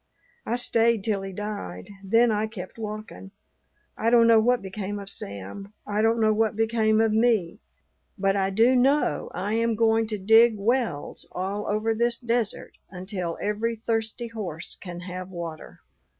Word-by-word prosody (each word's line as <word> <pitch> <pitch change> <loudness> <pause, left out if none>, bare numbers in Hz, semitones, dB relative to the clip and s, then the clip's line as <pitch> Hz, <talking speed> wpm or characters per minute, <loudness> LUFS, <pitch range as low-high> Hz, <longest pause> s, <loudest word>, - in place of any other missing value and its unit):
I 235 - 0
stayed 230 -3 +2
till 205 -3 0
he 195 0 -6
died; 190 - -6
then 230 +4 +4
I 215 +1 0
kept 210 -1 -9
walking. 215 -2 -7 0.7
I 225 - +1
don't 235 -1 +6
know 230 -1 +6
what 245 0 +2
became 195 +1 -5
of 200 -1 -6
Sam; 100 - -7
I 210 +1 -1
don't 225 +1 +2
know 215 -1 +3
what 220 0 +1
became 220 0 +2
of 225 -1 +3
me; 220 -4 +2 0.6
but 195 0 +1
I 195 -1 +1
do 230 +6 +4
know 275 +4 +2
I 205 +3 -2
am 230 0 +1
going 225 0 +2
to 215 -1 -3
dig 225 +3 +5
wells 220 - -1
all 195 +3 -3
over 215 +2 0
this 235 +1 0
desert 235 -2 -2
until 185 -2 -5
every 215 +3 -1
thirsty 225 +1 -2
horse 185 -8 -4
can 175 -2 -8
have 180 0 -7
water." 170 -3 -8
215 Hz, 165 wpm, -25 LUFS, 195-230 Hz, 0.7 s, don't